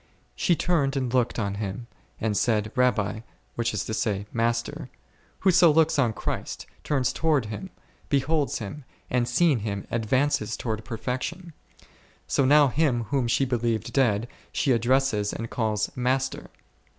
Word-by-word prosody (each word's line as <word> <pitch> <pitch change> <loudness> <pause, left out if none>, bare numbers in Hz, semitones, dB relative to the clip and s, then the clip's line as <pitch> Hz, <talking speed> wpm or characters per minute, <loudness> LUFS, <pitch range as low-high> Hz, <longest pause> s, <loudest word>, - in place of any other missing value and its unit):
She 175 - +2
turned 145 -6 +1
and 130 -2 -2
looked 125 -2 +1
on 100 -3 -1
Him, 100 +3 -4 0.3
and 110 -2 -1
said, 110 -1 +1
Rabbi; 120 -5 +1 0.3
which 120 0 -1
is 105 -5 -2
to 110 - -4
say, 105 -3 -1
Master: 115 0 -1 0.5
whoso 180 -2 +6
looks 160 -1 +3
on 120 -5 +3
Christ, - - -4 0.2
turns 135 -4 0
towards 150 -9 +1
Him, 150 - -6 0.4
beholds 145 +1 +1
Him, 120 +7 -7 0.3
and, 125 -1 +1
seeing 145 +1 +3
Him, 100 -2 -4
advances 115 0 0
towards 110 -2 -3
perfection; 130 - -4 0.7
so 140 - +1
now 145 +1 +6
Him 130 -4 +1
whom 135 -4 +1
she 130 +3 +2
believed 115 -3 -1
dead, 120 -5 +2 0.2
she 140 - +1
addresses 120 -3 +2
and 115 0 -5
calls 110 -3 -1
Master. 130 +1 -1
125 Hz, 145 wpm, -26 LUFS, 110-140 Hz, 0.7 s, whoso